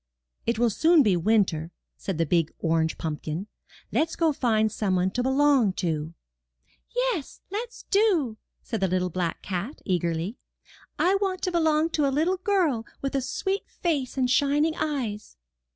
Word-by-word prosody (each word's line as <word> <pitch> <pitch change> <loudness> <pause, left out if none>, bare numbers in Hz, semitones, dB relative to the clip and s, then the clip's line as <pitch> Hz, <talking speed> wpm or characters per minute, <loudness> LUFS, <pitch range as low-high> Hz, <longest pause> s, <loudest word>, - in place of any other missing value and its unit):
''It 235 -1 +1
will 235 0 +3
soon 320 - +5
be 205 -6 +3
winter, 175 -4 +2 0.3
said 190 -5 -4
the 165 - +2
big 165 0 +1
orange 160 -1 0
pumpkin; 155 +3 -4 0.5
*'let*s 320 +1 +1
go 325 -3 +2
find 220 -5 +2
some 195 -3 0
one 185 +1 +1
to 245 - -1
belong 265 -5 +3
to. 160 -3 -2 0.7
''Yes, - - -2
let*s 465 +4 -5
do, 360 - +3 0.3
said 225 - -3
the 190 - +2
little 180 0 0
black 175 -1 -2
cat, 195 - -4
eagerly. 175 +3 -1 0.6
"I 380 +3 +3
want 375 -2 -1
to 365 - 0
belong 320 -1 +2
to 300 -3 +2
a 270 0 0
little 355 +5 +2
girl 360 - +1 0.2
with 275 - -1
a 275 - +1
sweet 385 +9 -2
face 285 -7 -2
and 255 -1 +2
shining 290 +4 +2
eyes. 245 - -3
245 Hz, 160 wpm, -26 LUFS, -, 0.7 s, soon